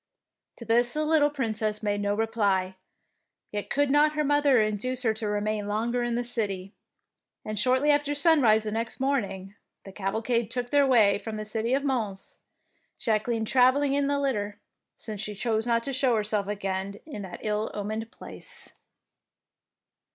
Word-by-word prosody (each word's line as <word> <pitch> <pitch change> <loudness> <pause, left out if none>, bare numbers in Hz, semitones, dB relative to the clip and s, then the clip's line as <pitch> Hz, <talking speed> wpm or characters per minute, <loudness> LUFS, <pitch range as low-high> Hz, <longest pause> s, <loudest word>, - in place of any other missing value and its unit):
To 235 - -10
this 240 +1 +2
the 305 0 0
little 305 -2 +4
Princess 215 -6 -2
made 205 -1 0
no 205 0 0 1.5
could 285 0 +1
not 300 +1 +4
her 300 0 0
mother 290 -3 +4
induce 220 +4 -1
her 225 -2 +2
to 220 0 -4
remain 210 0 -1
longer 230 +4 -1
in 240 -1 -1
the 240 - 0
city; 200 -5 -3 0.7
and 215 -1 -3
shortly 260 +6 +3
after 290 0 +1
sunrise 285 -9 +4
the 215 - -3
next 225 +1 -3
morning, 205 -8 -1 0.3
the 195 - -10
cavalcade 220 +4 -1
took 245 0 -3
their 285 -1 +4
way 210 -6 +4
from 215 +1 -6
the 215 - -5
city 225 +3 0
of 280 - -1
Mons, 225 -8 -3 0.6
Jacqueline 225 +1 0
travelling 265 +4 +3
in 280 0 +1
a 285 0 +1
litter, 210 -7 -2 0.4
since 215 -3 -6
she 210 -1 -4
chose 220 +2 -1
not 230 -1 +2
to 275 - -4
show 260 -2 +2
herself 210 -2 0
again 195 -1 -3
in 285 -10 -7
that 190 -3 -8
ill 210 0 -1
omened 215 +2 -4
place. - - -4
225 Hz, 160 wpm, -27 LUFS, 210-265 Hz, 1.5 s, little